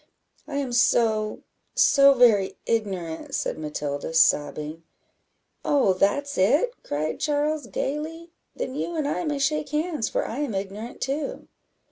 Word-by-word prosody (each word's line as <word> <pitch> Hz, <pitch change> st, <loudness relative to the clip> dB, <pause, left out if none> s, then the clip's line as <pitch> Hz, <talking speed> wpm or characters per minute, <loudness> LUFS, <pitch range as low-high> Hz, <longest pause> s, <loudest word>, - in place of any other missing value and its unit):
"I 280 Hz, -, -6 dB
am 275 Hz, -3 st, -2 dB
so 225 Hz, -4 st, +2 dB, 0.3 s
so 275 Hz, -1 st, +6 dB
very 220 Hz, -6 st, +4 dB
ignorant," 190 Hz, -8 st, -2 dB
said -, -, -2 dB
Matilda, 150 Hz, 0 st, -4 dB
sobbing. 150 Hz, +1 st, +2 dB, 0.8 s
"Oh, 275 Hz, -10 st, +3 dB
that's 280 Hz, +9 st, 0 dB
it!" 285 Hz, -, +3 dB
cried 155 Hz, +2 st, -3 dB
Charles, 300 Hz, 0 st, 0 dB
gaily; 320 Hz, +4 st, -4 dB, 0.2 s
"then 255 Hz, -, -4 dB
you 335 Hz, +4 st, -3 dB
and 305 Hz, -3 st, -1 dB
I 300 Hz, -, -1 dB
may 295 Hz, -2 st, -1 dB
shake 300 Hz, +2 st, 0 dB
hands, 300 Hz, -4 st, -1 dB
for -, -, -1 dB
I 240 Hz, -, -5 dB
am 280 Hz, -8 st, -2 dB
ignorant 200 Hz, +5 st, -5 dB
too." 280 Hz, +2 st, -3 dB
255 Hz, 135 wpm, -25 LUFS, 195-295 Hz, 0.8 s, so